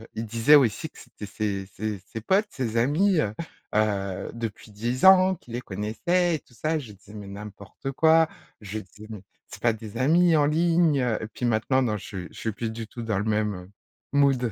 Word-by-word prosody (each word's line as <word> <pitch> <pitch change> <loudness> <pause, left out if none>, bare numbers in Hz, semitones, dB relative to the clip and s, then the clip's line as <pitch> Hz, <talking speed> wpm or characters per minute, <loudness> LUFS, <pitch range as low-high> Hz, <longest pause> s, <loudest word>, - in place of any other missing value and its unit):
il 115 - -3
disait 115 +7 +5
aussi 130 +2 +3
que - - -17
c'était 105 - -10
ses 100 -1 -3
ses 105 -1 -3
ses 100 +5 -8
potes, 195 - +2
ses 120 -5 -3
amis, 155 +10 +3
heu, 105 - -2 0.4
heu, 100 -3 0
depuis 115 -2 -6
10 120 - -2
ans, 190 0 +7
qu'il 125 -8 -14
les 120 - -3
connaissaient 160 - 0
et - - -4
tout 125 - -25
ça 155 +7 -1
et - - 0
je 120 -6 -11
disais: 100 +1 -17
«Mais 105 -1 -8
n'importe 100 +5 -8
quoi!», 160 +3 +5 0.3
je 105 +1 -5
disais: 105 +2 -13
«Mais 105 -4 -8 0.2
c'est - - -11
pas 120 - +4
des 110 -1 -10
amis 165 +6 +4
en 150 -2 +4
ligne!», 165 0 +3
heu, 120 -3 0
et - - -4
puis 110 +3 -5
maintenant, 120 +3 +2
non, 115 -4 0
je - - -10
suis 90 -3 -6
je - - -14
suis 110 - -2
plus 115 +2 -4
du 115 0 -6
tout 120 - -8
dans 110 -3 -1
le - - -1
même 105 -4 -1 0.4
mood 135 -4 +3
115 Hz, 220 wpm, -25 LUFS, 105-145 Hz, 0.4 s, ans